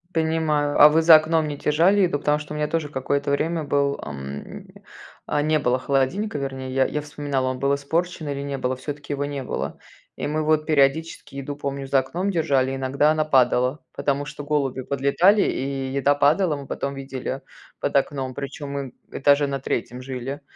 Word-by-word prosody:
Понимаю. 160 -2 +1
А 150 - +11
вы 155 +2 +3
за 160 0 +9
окном 155 0 +3
не 145 - -4
держали 170 +8 +3
еду? 175 -6 +1
Потому 150 +1 +1
что 150 0 -8
у 150 - -4
меня 150 - 0
тоже 160 -2 -1
какое-то 140 +1 -1
время 160 +2 0
был, 140 0 +1
эм, 70 0 -7 0.6
а, 145 - 0
не 155 0 +2
было 125 -3 +1
холодильника, 140 +8 0
вернее 135 -1 -5
я, 135 - +4
я 150 - -2
вспоминала: 145 -3 -2
он 130 0 -3
был 140 +1 +2
испорчен 160 +2 -2
или 140 -1 -3
не 140 -1 -4
было, 130 0 -1
всё-таки 145 +2 -6
его 145 0 -2
не 140 -2 -4
было. - - -4 0.4
И - - -3
мы 155 +1 -1
вот 155 0 +2
периодически 150 0 +1
еду, 140 +1 -5
помню, 140 -1 -4
за 135 0 +3
окном 170 +10 -2
держали, 135 -7 +1
иногда 135 +3 +2
она 155 -1 +1
падала, 130 -1 +3 0.2
потому 140 0 -1
что 150 0 -7
голуби 140 -3 -1
подлетали 140 +10 +3
и 135 0 -2
еда 140 +1 +2
падала, 150 +3 +3
мы 140 - -8
потом 140 +1 -3
видели 135 -1 -5 0.4
под - - 0
окном, 135 -2 0
причём 140 +1 -6
мы 140 -3 -4 0.2
этаже 145 +1 +3
на 140 0 -2
3 125 -1 -3
жили, 130 +2 -5
140 Hz, 190 wpm, -23 LUFS, 135-150 Hz, 0.6 s, А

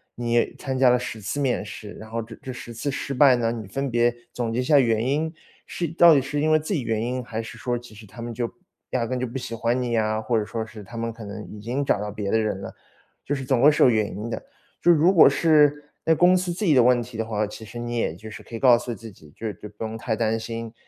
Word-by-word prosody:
你 120 0 -2
也 120 - +2
参 130 -1 -3
加 130 -1 +5
了 125 0 +4
10 115 -3 -6
次 105 +8 -3
面 130 -6 0
试， 105 0 -9
然 110 - -11
后 115 0 -2
这 115 0 -10
这 130 -2 -6
10 120 -1 -8
次 130 +5 -3
失 140 +1 -4
败 135 -2 +6
呢， 115 -1 0
你 115 -2 -6
分 135 +7 -3
别 120 0 +2 0.2
总 120 -2 -2
结 115 - -1
一 - - +1
下 150 +2 +4
原 115 -3 +2
因， 155 +4 0 0.3
是 170 - -3
到 170 +1 +6
底 145 - +5
是 145 +2 -2
因 155 +1 +2
为 155 - +5
自 155 +6 -4
己 155 - 0
原 110 -2 -1
因， 125 +2 -2
还 115 -2 -4
是 120 +2 -9
说 120 +1 -2
其 120 -2 -14
实 110 +1 -12
他 105 +4 -11
们 120 0 -5
就 120 0 -3 0.4
压 120 -2 0
根 130 - -2
就 125 - -1
不 125 +2 -5
喜 125 -3 -5
欢 120 +2 0
你 120 -1 -2
呀， 110 -1 +1
或 115 +1 0
者 110 - +1
说 110 +1 -4
是 110 -1 -11
他 100 +5 -10
们 115 0 -3
可 115 0 -10
能 105 +1 -7
已 105 - -10
经 125 +6 -2
找 105 - +1
到 105 0 -4
别 105 -1 -4
的 110 - +3
人 110 -3 -1
了， - - -8 0.5
就 145 - -2
是 135 -2 -3
总 125 -2 +2
归 145 +3 +8
是 150 - -1
有 - - +7
原 110 -3 +2
因 110 +3 -5
的。 110 - -5 0.4
就 175 - +6
如 170 +3 +5
果 175 - +8
是 150 -2 +3 0.2
那 160 - +4
公 180 +3 +5
司 180 -1 0
自 185 +5 -3
己 160 - +4
的 130 - +6
问 125 +1 +5
题 115 -1 -9
的 - - +1
话， 110 -1 -1
其 105 +2 -9
实 110 +2 -10
你 120 0 -3
也 100 -8 -1
就 110 +4 -10
是 - - -9
可 115 - -10
以 - - -4
告 125 -2 +6
诉 120 -1 -5
自 115 -1 -10
己， 80 -5 -18
就 115 - -8
是 110 - -2
就 105 +3 -10
不 105 +2 -9
用 110 0 -4
太 110 0 -2
担 110 0 0
心， 115 0 -6
120 Hz, 315 characters per minute, -24 LUFS, 110-135 Hz, 0.5 s, 归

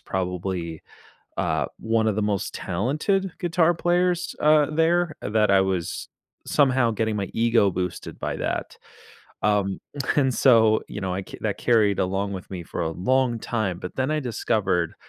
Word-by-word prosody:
probably, 90 -3 -3 0.6
uh, - - 0
1 110 0 +1
of 105 - +1
the 110 - 0
most 105 -2 -1
talented 155 - -1
guitar 170 -1 +2
players, 175 +1 0
uh, 150 -1 +5
there, 165 +1 +2
and 105 - -5
that 105 -1 +4
I 95 -1 +5
was 95 -3 -2 0.4
somehow 130 -5 +3
getting 110 0 -1
my 100 - -3
ego 115 -4 +3
boosted 90 0 -4
by - - -3
that. - - -3 0.7
Um, 100 -2 +1 0.4
and 135 -3 +3
so, 110 -4 +5
you 105 - -6
know, 95 -1 -2
I 95 +1 -3 0.2
that - - -1
carried 110 -4 +3
along 95 +2 -1
with 95 -2 -7
me 90 -2 -5
for - - -5
a 80 - 0
long 120 +8 +1
time, 105 -7 -2
but 90 - -7
then 130 +1 0
I 155 - +1
discovered, 100 - -1
110 Hz, 165 wpm, -24 LUFS, 95-135 Hz, 0.7 s, uh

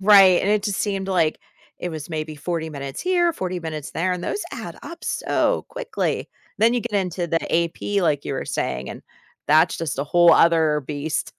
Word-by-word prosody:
right, 195 -2 +7
and 200 - 0
it 210 -1 +2
just 205 -3 -1
seemed 195 -2 -2
like 170 -5 +1 0.4
it 180 - -4
was 155 0 -7
maybe 155 -1 -4
40 160 +1 -3
minutes 140 -2 -6
here, 350 -2 +2
40 185 - -4
minutes 155 -3 -6
there, 185 +3 0
and 180 -1 -4
those 415 - -2
add - - -7
up 340 0 -9
so - - 0
quickly, - - -3 0.3
then 230 +2 +4
you 245 - +1
get 205 -2 0
into 180 -1 -3
the 165 - +2 0.3
AP, 200 +4 -2
like 150 -4 +1
you - - -3
were - - -3
saying, 65 +1 -3
and - - -9 0.4
that's 155 +3 +4
just 165 -5 -3
a 140 - 0
whole 175 +3 +5
other 160 -2 +4
beast. 150 +1 -3
170 Hz, 200 wpm, -22 LUFS, 155-195 Hz, 0.4 s, right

